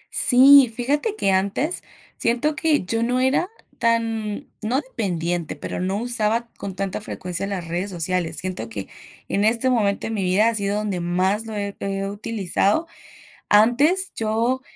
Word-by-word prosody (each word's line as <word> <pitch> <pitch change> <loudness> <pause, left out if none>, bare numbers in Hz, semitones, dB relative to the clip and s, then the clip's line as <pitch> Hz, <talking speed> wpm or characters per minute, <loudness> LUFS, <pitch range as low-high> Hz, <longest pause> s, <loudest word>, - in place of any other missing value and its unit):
Sí, 265 0 +8
fíjate 290 - -1
que 195 - +1
antes 200 - 0 0.4
siento 245 +6 0
que 305 - +1
yo 225 +5 -1
no 245 +2 0
era 265 +8 +1 0.3
tan, 225 -2 -1
no 235 +5 0
dependiente, 175 - -3
pero - - -6
no 190 +2 -1
usaba 235 0 +1
con 195 -2 -7
tanta 195 +1 -3
frecuencia 180 -1 -4
las 185 -4 -4
redes 175 +4 -3
sociales. 175 -1 -2
Siento 180 -12 -5
que 100 -3 -6 0.4
en 200 - 0
este 230 +4 +2
momento 205 -5 0
de - - -3
mi 210 -3 -2
vida 190 +5 +3
ha - - -2
sido 200 -1 0
donde 210 -4 -2
más 185 +5 0
lo 220 - -6
he 200 -1 -4
he 195 0 -3
utilizado. 205 - 0 0.7
Antes, 280 - +4
yo, 230 +4 0
215 Hz, 160 wpm, -22 LUFS, 190-245 Hz, 0.7 s, Sí